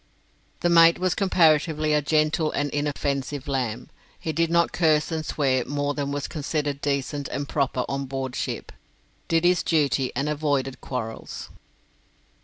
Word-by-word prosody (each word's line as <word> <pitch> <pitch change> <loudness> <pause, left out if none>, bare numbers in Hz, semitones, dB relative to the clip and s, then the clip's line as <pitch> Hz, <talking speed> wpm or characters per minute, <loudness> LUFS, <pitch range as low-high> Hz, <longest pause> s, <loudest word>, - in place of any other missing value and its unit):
The 175 - +2
mate 170 0 +7
was 185 0 +1
comparatively 155 -5 +3
a 150 - +3
gentle 155 +1 +1
and 145 0 -1
inoffensive 145 -1 -2
lamb. 125 -3 -2 0.3
He 160 - -3
did 165 0 +1
not 170 0 +3
curse 155 -2 +2
and 160 -1 -2
swear 135 -4 +1
more 145 0 -1
than 140 -1 -3
was 145 -1 -3
considered 145 -2 -3
decent 140 0 -2
and 140 0 -4
proper 135 -3 0
on 135 0 -2
board 135 -1 -4
ship, - - -4 0.6
did 165 +1 +2
his 180 0 +4
duty, 140 -5 +1
and 140 +4 -1
avoided 145 -3 -1
quarrels. 115 -4 -6
145 Hz, 150 wpm, -25 LUFS, 140-160 Hz, 0.6 s, mate